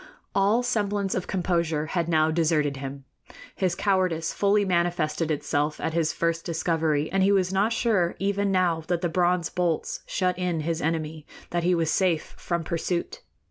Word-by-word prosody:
All 205 Hz, +5 st, +3 dB
semblance 205 Hz, -5 st, 0 dB
of 185 Hz, -, -3 dB
composure 170 Hz, -4 st, 0 dB
had 170 Hz, +1 st, -1 dB
now 160 Hz, -1 st, +3 dB
deserted 155 Hz, -3 st, +1 dB
him. 135 Hz, 0 st, -6 dB, 0.5 s
His 185 Hz, -2 st, 0 dB
cowardice 185 Hz, -4 st, 0 dB
fully 205 Hz, 0 st, +2 dB
manifested 170 Hz, -3 st, 0 dB
itself 150 Hz, 0 st, -1 dB
at 160 Hz, -, -2 dB
his 165 Hz, -1 st, +1 dB
first 165 Hz, 0 st, -1 dB
discovery, 160 Hz, -2 st, 0 dB
and 195 Hz, -, +1 dB
he 195 Hz, +1 st, +4 dB
was 190 Hz, -2 st, +2 dB
not 200 Hz, +4 st, +2 dB
sure, 215 Hz, -7 st, +1 dB
even 200 Hz, 0 st, 0 dB
now 180 Hz, -3 st, +2 dB
that 175 Hz, -1 st, 0 dB
the 175 Hz, -, 0 dB
bronze 175 Hz, 0 st, +1 dB
bolts 175 Hz, -3 st, -1 dB
shut 185 Hz, -1 st, 0 dB
in 175 Hz, -3 st, -1 dB
his 165 Hz, +1 st, -2 dB
enemy, 160 Hz, -1 st, -2 dB, 0.2 s
that 175 Hz, -, 0 dB
he 180 Hz, +1 st, +3 dB
was 165 Hz, -2 st, +1 dB
safe 175 Hz, -2 st, +1 dB
from 170 Hz, -1 st, -2 dB
pursuit. 170 Hz, -, -3 dB
170 Hz, 170 wpm, -26 LUFS, 160-190 Hz, 0.5 s, he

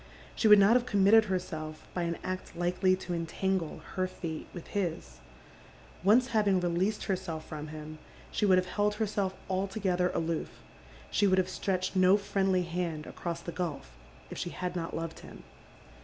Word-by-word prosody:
She 225 Hz, -, +2 dB
would 210 Hz, -1 st, +10 dB
not 200 Hz, +3 st, +6 dB
have 250 Hz, 0 st, +2 dB
committed 210 Hz, +1 st, +5 dB
herself 155 Hz, -5 st, -4 dB
by 180 Hz, -, -1 dB
an 170 Hz, -1 st, -1 dB
act 185 Hz, 0 st, -5 dB
likely 180 Hz, +2 st, +2 dB
to 185 Hz, -1 st, -5 dB
entangle 170 Hz, +1 st, -2 dB
her 185 Hz, 0 st, 0 dB
fate 165 Hz, -3 st, -6 dB
with 175 Hz, -, -8 dB
his. 160 Hz, -, -3 dB, 0.8 s
Once 235 Hz, +7 st, +5 dB
liaving 205 Hz, -4 st, +3 dB
released 180 Hz, +5 st, 0 dB
herself 180 Hz, -5 st, -3 dB
from 155 Hz, -1 st, -6 dB
him 155 Hz, 0 st, -8 dB, 0.3 s
she -, -, -2 dB
would 190 Hz, -3 st, +6 dB
have 185 Hz, -, +2 dB
held 205 Hz, +3 st, 0 dB
her 220 Hz, +1 st, 0 dB
seir 200 Hz, -2 st, 0 dB, 0.2 s
altogether 190 Hz, -1 st, 0 dB
aloof 165 Hz, -1 st, -3 dB, 0.2 s
— -, -, -20 dB
KJie 205 Hz, -, +4 dB
would 185 Hz, -, +3 dB
have 185 Hz, 0 st, +2 dB
stretched 185 Hz, 0 st, -2 dB
no 185 Hz, +1 st, +6 dB
friendly 195 Hz, -2 st, +1 dB
hand 170 Hz, -3 st, -3 dB
across 170 Hz, -1 st, -5 dB
Die 170 Hz, -, -5 dB
gidf 165 Hz, -3 st, -3 dB, 0.5 s
if -, -, -6 dB
she 175 Hz, -, -4 dB
Ind 180 Hz, 0 st, -2 dB
not 165 Hz, -2 st, -3 dB
loved 165 Hz, 0 st, -4 dB
him. -, -, -12 dB
185 Hz, 175 wpm, -30 LUFS, 170-195 Hz, 0.8 s, would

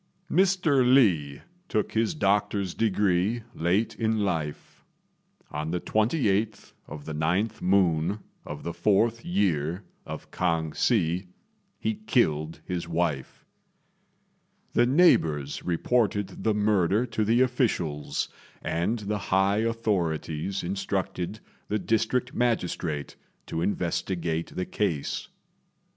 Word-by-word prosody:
Mr. 180 Hz, -8 st, +3 dB
Li 95 Hz, -, +3 dB, 0.3 s
took 105 Hz, -, 0 dB
his 115 Hz, +7 st, +1 dB
doctor's 100 Hz, -, +1 dB
degree 105 Hz, +1 st, +1 dB
late 90 Hz, +7 st, +1 dB
in 110 Hz, -1 st, +1 dB
life. 80 Hz, -7 st, -3 dB, 0.7 s
On 75 Hz, -, -3 dB
the 90 Hz, +2 st, -1 dB
28th 110 Hz, -, 0 dB
of 75 Hz, -1 st, -9 dB
the 80 Hz, -, -5 dB
9th 90 Hz, +9 st, 0 dB
moon 90 Hz, -1 st, +2 dB, 0.3 s
of -, -, -7 dB
the 85 Hz, -, -3 dB
4th 110 Hz, +5 st, +2 dB
year 90 Hz, -, 0 dB, 0.2 s
of -, -, -8 dB
K'ang 80 Hz, -3 st, 0 dB
Hsi, 90 Hz, -5 st, +1 dB, 0.5 s
he 220 Hz, -, -1 dB
killed 85 Hz, -, 0 dB
his 90 Hz, -2 st, -3 dB
wife. 80 Hz, -5 st, -2 dB, 1.3 s
The 120 Hz, -, +4 dB
neighbours 80 Hz, -, +3 dB
reported 100 Hz, +1 st, 0 dB
the 110 Hz, -1 st, +2 dB
murder 105 Hz, +1 st, +2 dB
to 110 Hz, -2 st, -1 dB
the 115 Hz, +4 st, +3 dB
officials, 105 Hz, -, 0 dB, 0.4 s
and 90 Hz, +8 st, 0 dB
the 105 Hz, 0 st, -2 dB
high 95 Hz, +2 st, +3 dB
authorities 95 Hz, -6 st, -1 dB
instructed 95 Hz, +1 st, -2 dB, 0.3 s
the 105 Hz, -, 0 dB
district 115 Hz, +5 st, 0 dB
magistrate 90 Hz, -, -1 dB, 0.3 s
to 80 Hz, -, -3 dB
investigate 85 Hz, -3 st, -1 dB
the 90 Hz, -, -2 dB
case. 85 Hz, -9 st, -2 dB
100 Hz, 110 wpm, -27 LUFS, 85-115 Hz, 1.3 s, The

